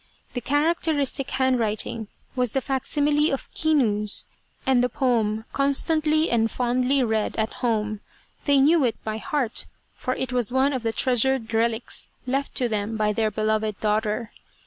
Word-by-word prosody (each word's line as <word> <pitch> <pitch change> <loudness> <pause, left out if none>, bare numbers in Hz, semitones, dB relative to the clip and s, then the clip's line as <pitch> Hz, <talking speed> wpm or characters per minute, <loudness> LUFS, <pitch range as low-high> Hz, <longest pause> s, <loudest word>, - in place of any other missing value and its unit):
The 245 - -3
characteristic 290 0 +1
handwriting 230 -4 0 0.3
was 250 -3 0
the 270 - +2
facsimile 290 +3 +1
of 275 - -4
Kinu's, 220 -10 +1 0.4
and 255 -2 +3
the 250 - +1
poem 225 -5 0
constantly 310 +3 +2
and 225 -1 +2
fondly 255 +3 +1
read 220 -2 0
at 220 0 -1
home 215 -3 0 0.5
they 285 -1 +4
knew 305 +3 +5
it 235 -3 +1
by 215 0 -3
heart, 260 -3 -2 0.3
for 255 - -3
it 260 -1 -3
was 245 -2 0
one 265 +2 +2
of 260 - -2
the 225 -1 -1
treasured 250 -1 +1
relics 225 +1 0 0.2
left 275 +2 -2
to 250 - +1
them 215 0 -2
by 210 -1 +1
their 220 0 +1
beloved 215 -1 -1
daughter. 215 +1 -1
245 Hz, 150 wpm, -24 LUFS, 220-275 Hz, 0.5 s, knew